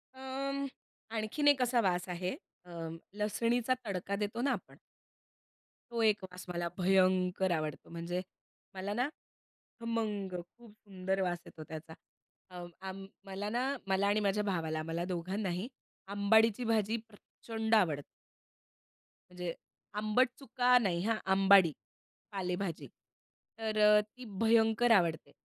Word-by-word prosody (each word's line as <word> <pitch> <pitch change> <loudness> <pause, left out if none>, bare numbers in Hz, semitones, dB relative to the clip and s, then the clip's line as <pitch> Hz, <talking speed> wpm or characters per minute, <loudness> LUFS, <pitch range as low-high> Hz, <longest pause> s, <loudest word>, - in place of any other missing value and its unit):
अं, 275 +1 -3 0.5
आणखीन 220 +7 0
एक 285 -2 +6
असा 245 -1 +3
वास 180 -2 +1
आहे, 180 +4 -2 0.3
अ, - - -16 0.5
लसणीचा 230 +4 +1
तडका 195 -1 -2
देतो 205 +3 -2
ना 275 +2 +2
आपण. - - -5 1.1
तो 235 -1 -1
एक 210 -2 +3
वास 180 -1 -9
मला 175 -1 -1
भयंकर 185 0 +3
आवडतो. 155 -3 -2
म्हणजे 170 +2 -3 0.5
मला 190 +2 -3
ना 245 +5 +1 0.7
खमंग, 215 -5 -2 0.2
खूप 235 -2 -15
सुंदर 190 -2 -3
वास 180 -2 0
येतो 155 - -10
त्याचा. 160 0 -7 0.6
अ, 180 -1 -8 0.3
अं, 195 +1 -7 0.2
मला 195 +1 -4
ना, 240 +3 0 0.2
मला 195 +1 +2
आणि 205 +1 +3
माझ्या 205 0 +1
भावाला 165 -6 -1
आम्हाला 165 +2 -2
दोघांनाही 185 +2 -2 0.5
आंबाडीची 220 +3 +4
भाजी 220 0 +2
प्रचंड 220 +1 -2
आवडते. 155 -9 +3 1.3
म्हणजे 180 -1 -4 0.4
आंबट 215 +5 +3
चुका 250 -1 +4
नाही 190 -8 +1
हा, 225 +2 +2 0.2
आंबाडी 190 -3 +7 0.6
पालेभाजी. 180 -3 -3 0.7
तर 220 -1 -2 0.2
अ, - - +5
ती 230 +4 -13
भयंकर 225 +1 +4
आवडते 170 -7 +3
200 Hz, 125 wpm, -33 LUFS, 180-225 Hz, 1.3 s, आंबाडी